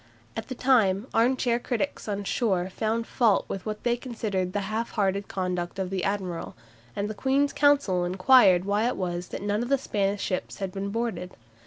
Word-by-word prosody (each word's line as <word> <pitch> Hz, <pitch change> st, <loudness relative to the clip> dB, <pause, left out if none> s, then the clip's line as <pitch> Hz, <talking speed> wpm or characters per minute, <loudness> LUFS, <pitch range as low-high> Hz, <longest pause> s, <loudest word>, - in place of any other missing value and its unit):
At 225 Hz, 0 st, -5 dB
the 255 Hz, -, -5 dB
time 220 Hz, -6 st, +3 dB
arm 245 Hz, +3 st, +3 dB
chair 240 Hz, -2 st, +1 dB
critics 245 Hz, +1 st, -3 dB
on 205 Hz, -1 st, -2 dB
shore 190 Hz, -4 st, 0 dB
found 225 Hz, +4 st, -1 dB
fault 230 Hz, -5 st, +2 dB
with 195 Hz, +2 st, -5 dB
what 215 Hz, 0 st, -4 dB
they 240 Hz, -1 st, +2 dB
considered 215 Hz, -7 st, -3 dB
the 205 Hz, +1 st, -1 dB
half 215 Hz, +4 st, -2 dB
hearted 200 Hz, -2 st, 0 dB
conduct 180 Hz, -2 st, -3 dB
of 190 Hz, -1 st, -3 dB
the 190 Hz, -2 st, -2 dB
admiral, 190 Hz, -4 st, -3 dB, 0.4 s
and 200 Hz, -, -1 dB
the 215 Hz, -, -4 dB
Queen's 270 Hz, +5 st, +1 dB
Council 280 Hz, -12 st, +3 dB
inquired 185 Hz, 0 st, +5 dB
why 205 Hz, +3 st, +1 dB
it 250 Hz, -, -1 dB
was 175 Hz, -1 st, -3 dB
that -, -, -6 dB
none 205 Hz, +1 st, 0 dB
of 240 Hz, -, -3 dB
the 275 Hz, -, +4 dB
Spanish 200 Hz, -5 st, -1 dB
ships 185 Hz, -, -3 dB
had 195 Hz, -2 st, -4 dB
been 195 Hz, +1 st, -4 dB
boarded. 205 Hz, -5 st, -3 dB
205 Hz, 195 wpm, -26 LUFS, 190-235 Hz, 0.4 s, inquired